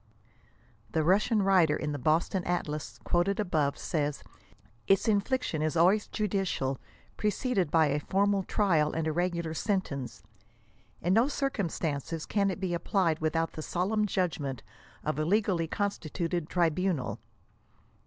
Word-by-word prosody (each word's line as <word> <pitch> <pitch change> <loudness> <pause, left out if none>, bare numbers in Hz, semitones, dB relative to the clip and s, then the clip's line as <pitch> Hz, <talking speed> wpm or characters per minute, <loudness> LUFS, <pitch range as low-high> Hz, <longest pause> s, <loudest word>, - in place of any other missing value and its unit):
The 160 - +2
Russian 205 +5 +3
writer 180 -6 +4
in 150 -1 -3
the 145 - -4
Boston 165 +6 +1
Atlas, 150 -9 -3
quoted 180 +4 +1
above, 155 -8 0
says, 150 -3 -2 0.3
" 105 +3 -33
its 195 +3 +3
infliction 205 - +1
is 155 +2 0
always 190 +6 +4
judicial, 190 - -1 0.4
preceded 210 - 0
by 160 0 +4
a 145 0 +1
formal 200 +5 +1
trial 175 -7 +1
and 165 -1 -1
regular 175 -1 -1
93 - - -4
sentence. 160 - -2 0.8
In 175 +2 +2
no 230 +5 +4
circumstances 165 - -2
can 200 -2 +1
it 190 - -4
be 185 -2 -2
applied 170 -1 +1
without 165 +1 0
the 155 - -7
solemn 205 +6 0
judgment 160 - -2 0.4
of 155 0 -2
a - - +1
legally 185 -2 +1
constituted 170 -3 -2
tribunal." 170 - 0
175 Hz, 135 wpm, -29 LUFS, 155-195 Hz, 0.8 s, writer